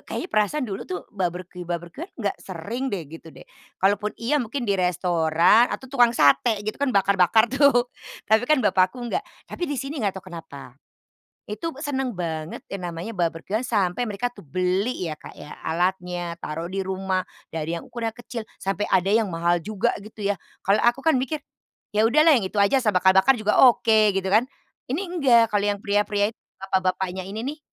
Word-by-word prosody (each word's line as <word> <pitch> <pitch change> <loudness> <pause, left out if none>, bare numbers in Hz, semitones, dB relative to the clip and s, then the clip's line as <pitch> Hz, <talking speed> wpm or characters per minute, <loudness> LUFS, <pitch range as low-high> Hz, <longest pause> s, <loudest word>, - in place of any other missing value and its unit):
kayaknya 365 - -4
perasaan 235 +7 +1
dulu 195 -4 -5
tuh 180 -1 -4
barbeque-barbeque-an 180 - -5
nggak 205 -5 -2
sering 215 +9 -5
deh 190 -7 -3
gitu 165 +2 -12
deh. - - -14 0.3
Kalaupun 205 +2 +1
iya 280 +6 0
mungkin 245 +2 -3
di 200 - +1
restoran 180 +3 +3
atau - - -5
tukang 245 -3 +3
sate 205 - +3
gitu 215 +6 -4
kan, 285 - +2
bakar-bakar 200 0 +4
tuh, 265 -3 +3 0.3
tapi 220 +3 +2
kan 295 -7 +3
bapak 185 -2 +4
aku 245 +2 -9
enggak. 240 - -1 0.2
Tapi 350 - -5
di 290 - -2
sini 275 +2 -4
nggak 195 -3 -1
tahu 185 -1 -10
kenapa, 145 -6 -10 0.7
itu 210 - -7
be 270 - -14
senang 270 -4 -2
banget 165 -5 -4
yang 195 -2 -6
namanya 170 +7 -6
barbeque-an 175 +5 -1
sampai 210 -3 0
mereka 240 +2 -3
tuh - - -13
beli 185 - -1
ya, 155 - -3
Kak, - - -13
ya 150 - -9
alatnya, 175 0 -1
taruh 165 +3 -4
di 195 +2 -3
rumah. 190 0 -1 0.3
Dari 165 +1 -2
yang - - -12
ukurannya 235 -2 -3
kecil 240 -1 -6 0.2
sampai 195 +1 -2
ada 195 +3 +3
yang 220 -4 +2
mahal 170 +1 +1
juga 210 +1 -1
gitu 210 -1 -7
ya. 205 - +2 0.3
Kalau 200 +2 +3
aku 250 +5 +2
kan 320 - +5
mikir, 265 +4 -1 0.6
ya 215 - +3
udahlah 305 +7 +5
yang 225 -8 +1
itu 210 - -4
aja 225 +7 +4
asal 220 - +3
bakar-bakar 190 +6 +4
juga 215 0 +3
oke, 220 -4 +5
gitu 190 - -1
kan. 210 +5 +4 0.5
Ini 295 +8 0
enggak, 245 -11 +3
kalau 205 0 +2
yang 200 - -2
pria-pria 205 +1 +1
itu - - -75 0.2
bapak-bapaknya 190 -1 -1
ini 215 +4 -5
nih, 300 +3 -4
205 Hz, 185 wpm, -24 LUFS, 180-240 Hz, 0.7 s, kan